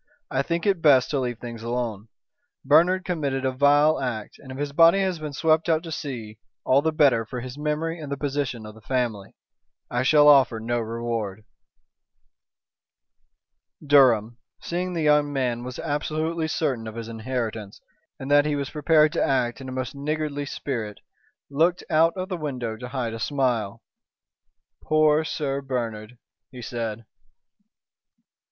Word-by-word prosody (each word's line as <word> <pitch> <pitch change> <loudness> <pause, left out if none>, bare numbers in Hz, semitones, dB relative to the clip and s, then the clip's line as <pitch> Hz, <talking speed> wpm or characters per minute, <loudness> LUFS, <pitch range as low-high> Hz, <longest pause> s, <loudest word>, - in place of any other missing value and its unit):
"I 135 - +1
think 170 +5 -2
it 200 -2 +3
is - - -19
best 135 -5 +5
to 145 - 0
leave 125 -2 -2
things 115 -1 -8
alone. 115 -3 -3 0.6
Bernard 175 +7 +4
committed 140 -7 -2
a 130 - +1
vile 145 +3 +4
act, 115 -5 -4
and 130 - -11
if 130 - -7
his 145 0 -3
body 165 +5 +6
has 185 -3 -1
been 155 -1 -5
swept 160 +3 +1
out 160 0 +2
to 165 - -7
sea 120 -9 -6 0.3
all 135 +2 +4
the 160 +1 0
better 140 -7 +3
for 125 +3 -6
his 125 +1 -7
memory 155 +3 -2
and 150 -3 -7
the 140 - -2
position 140 -5 -3
of 105 - -9
the 110 - -16
family. 115 -5 -2 0.6
I 120 - 0
shall 145 +3 +5
offer 135 -6 +5
no 120 +2 -1
reward." 115 -3 -4 2.4
Durham, 120 -5 +4 0.2
seeing 180 +1 -3
the 165 - -1
young 150 -1 +3
man 125 -4 -1
was 125 0 -7
absolutely 155 +2 -2
certain 130 -8 -2
of 110 - -8
his 115 -1 -6
inheritance, 115 -3 -4 0.4
and 135 +1 -5
that 145 +1 +5
he 150 - 0
was 140 -1 -3
prepared 155 0 +3
to - - +1
act 120 -3 0
in 130 - -7
a - - -6
most 130 -1 -4
niggardly 145 0 -3
spirit, 115 -8 -5 0.5
looked 165 +5 +2
out 165 +1 +4
of 185 0 -3
the 185 -2 -4
window 125 -8 -4
to 125 +3 -8
hide 125 -3 -3
a 115 - -6
smile. 125 -6 -1 1.0
"Poor 155 0 +3
Sir 140 -3 -3
Bernard," 120 -3 -4 0.3
he 125 -2 -10
said. 115 -1 -4
135 Hz, 165 wpm, -24 LUFS, 120-155 Hz, 2.4 s, body